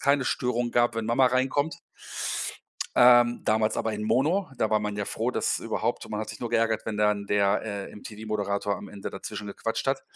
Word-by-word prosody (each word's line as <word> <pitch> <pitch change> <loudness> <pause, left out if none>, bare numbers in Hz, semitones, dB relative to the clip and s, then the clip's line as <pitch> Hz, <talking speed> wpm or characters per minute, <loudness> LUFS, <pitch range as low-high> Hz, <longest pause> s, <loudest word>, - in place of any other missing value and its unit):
keine 140 -1 +3
Störung 120 -1 0
gab, 120 0 +3
wenn 110 -1 -2
Mama 125 +3 +4
reinkommt. 135 +5 +1 1.2
Ähm, 120 -1 +6
damals 110 0 +2
aber 110 - -1
in 105 - -4
mono, 155 - +1
da 110 - +2
war 110 -1 +2
man 105 -1 -3
ja 105 - -1
froh, 115 +5 -1
dass - - 0
überhaupt - - -2
man 105 - -2
hat 110 - -5
sich - - -8
nur 120 - -3
geärgert, 115 -1 +2
wenn 110 - -2
dann 105 -1 +1
der, 100 -1 +2
äh, 100 -3 -5
MTV-Moderator 105 -1 -3
am - - -9
Ende 100 -1 -7
dazwischen 105 +2 -6
gequatscht 115 +4 -3
hat 135 0 0
110 Hz, 195 wpm, -27 LUFS, 105-125 Hz, 1.2 s, Ähm